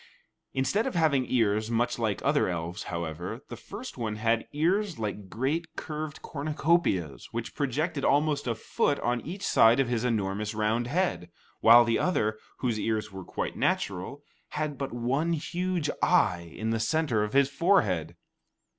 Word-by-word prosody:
Instead 135 - +1
of 260 - -4
having 145 -6 +2
ears 110 -3 +2
much 120 +1 0
like 110 -5 -1
other - - +3
elves, 85 +2 -4
however, 85 - -4
the 120 - -6
first 200 - -9
one 110 -2 -2
had 115 +1 0
ears 180 +5 +1
like 105 -3 -4
great 145 - -2
curved 155 -1 -5
cornucopias, 150 - 0
which 115 0 -4
projected 145 +2 -1
almost 145 -1 +2
a 115 - 0
foot 140 +5 0
on 120 0 0
each 190 +5 -7
side 115 +3 +5
of 135 -3 +2
his 120 -2 0
enormous 105 -2 -1
round 110 +3 0
head, 160 - -1 0.3
while 120 +1 +8
the 115 -1 +1
other, 110 -12 0 0.2
whose 120 -4 0
ears 110 -4 -1
were 95 -1 -7
quite - - -4
natural, 100 +10 -1 0.3
had 150 -1 -1
but 135 0 -4
one 135 +8 0
huge 175 +1 -2
eye 85 -2 +2
in 110 +1 -2
the 115 - 0
centre 120 -2 +1
of 105 - -4
his 140 0 +5
forehead. 110 - +1
120 Hz, 160 wpm, -28 LUFS, 105-150 Hz, 0.3 s, while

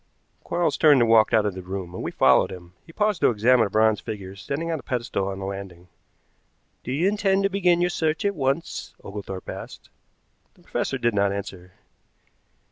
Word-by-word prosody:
Quarles 175 -1 0
turned 150 -4 +6
and 115 -1 +3
walked 110 -1 +5
out 110 -2 +3
of 105 - -1
the 95 - -7
room, 90 -1 -6
and - - -6
we - - -3
followed 65 - +3
him. 90 -1 -11
He - - -12
paused 210 -1 0
to - - +5
examine 115 +1 +3
a - - -10
bronze 110 0 +3
figure 100 -4 -7
standing 145 - -4
on 160 - -2
a - - -9
pedestal 115 -6 -2
on 95 -1 -4
the 95 - -5
landing. 95 -3 -8 0.9
"Do 125 - -5
you 155 +8 +1
intend 195 -1 +1
to 195 - +2
begin 180 -3 +2
your 175 0 +1
search 160 +4 -1
at 200 - +2
once?" 140 0 -2
Oglethorpe 100 -2 -7
asked. - - -9 0.6
The - - -24
professor - - -2
did 120 -1 0
not 100 -1 +2
answer. 95 -2 -7
110 Hz, 200 wpm, -24 LUFS, 95-160 Hz, 0.9 s, turned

